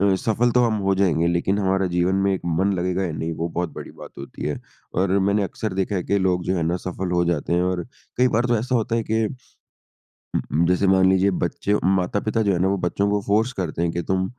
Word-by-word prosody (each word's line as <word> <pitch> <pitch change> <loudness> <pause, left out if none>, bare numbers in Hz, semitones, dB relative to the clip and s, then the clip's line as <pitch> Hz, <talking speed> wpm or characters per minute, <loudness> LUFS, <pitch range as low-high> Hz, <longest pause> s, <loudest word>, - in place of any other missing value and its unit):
अ, 100 -1 +4
सफ़ल 115 +4 +1
तो 125 +1 +3
हम 115 -2 +1
हो 95 0 +2
जाएँगे, 85 -4 +2
लेकिन 85 +4 +1
हमारा 95 -1 +1
जीवन 90 +1 +1
में 95 0 +2
एक - - -4
मन 90 +4 +1
लगेगा 90 +1 -1
या 85 - -2
नहीं, 80 +1 -3
वो 85 +2 -3
बहुत 85 -2 -3
बड़ी - - -8
बात - - -12
होती - - -9
हैं। 75 - -3 0.3
और 95 +2 +2
मैंने 100 +2 +2
अक्सर 100 +1 -4
देखा 95 +1 -1
है 90 - -1
कि 100 - +1
लोग 90 -2 0
जो 95 0 0
है 85 - 0
ना, 85 +2 0
सफ़ल 90 0 -4
हो 85 0 +2
जाते 85 -1 -1
हैं 90 +1 +2
और 90 -1 -1 0.3
कई 125 +1 +4
बार 120 +2 +1
तो 120 -1 +2
ऐसा 125 +3 -2
होता 115 0 +1
है 115 - 0
कि 110 0 +2
उ 130 +3 -11 1.1
उ - - +4
जैसे 90 +2 +2
मान 95 0 +5
लीजिए 95 +1 +3
बच्चे 100 +3 -1
माता-पिता 95 +4 +1
जो 100 - +2
है - - 0
ना, 95 - +2
वो 100 0 +1
बच्चों 100 +3 0
को 105 0 +1
फ़ोर्स 110 +5 +2
करते 85 -4 -3
हैं 85 -1 +1
कि 85 - -2
तुम 95 0 +1
95 Hz, 255 wpm, -23 LUFS, 90-100 Hz, 1.1 s, मान